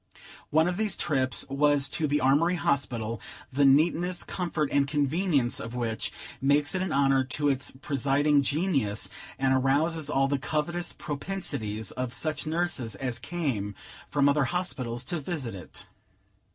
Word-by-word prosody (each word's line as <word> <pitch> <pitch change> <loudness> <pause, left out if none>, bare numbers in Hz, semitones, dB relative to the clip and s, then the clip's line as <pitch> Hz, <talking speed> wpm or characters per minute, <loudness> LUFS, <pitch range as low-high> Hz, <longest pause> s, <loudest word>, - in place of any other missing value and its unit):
One 160 +2 +4
of 180 0 -1
these 215 -2 0
trips 135 -6 +1
was 140 0 +3
to 155 - 0
the 145 +1 +1
Armory 150 +7 +4
Hospital, 120 -8 -1 0.3
the 140 +1 +4
neatness, 170 +6 +3
comfort, 170 -5 -2
and 140 -1 +3
convenience 145 -2 +1
of 115 +1 -6
which 115 -2 -2 0.3
makes 145 +3 +3
it 185 - 0
an 190 - -1
honor 135 -1 +3
to 145 +3 0
its 135 0 0
presiding 140 +2 +2
genius, 140 - 0 0.3
and 135 0 +2
arouses 145 +4 +1
all 135 -2 +2
the 140 0 0
covetous 160 +5 -1
propensities 140 - -4
of 125 -1 -3
such 155 +4 -1
nurses 155 - -1
as 120 +3 -3
came 130 - -2 0.3
from 145 -1 +3
other 140 -1 +3
hospitals 130 -8 -2
to 175 -2 -3
visit 140 - -3
it. 95 -2 -8
140 Hz, 150 wpm, -28 LUFS, 130-160 Hz, 0.3 s, One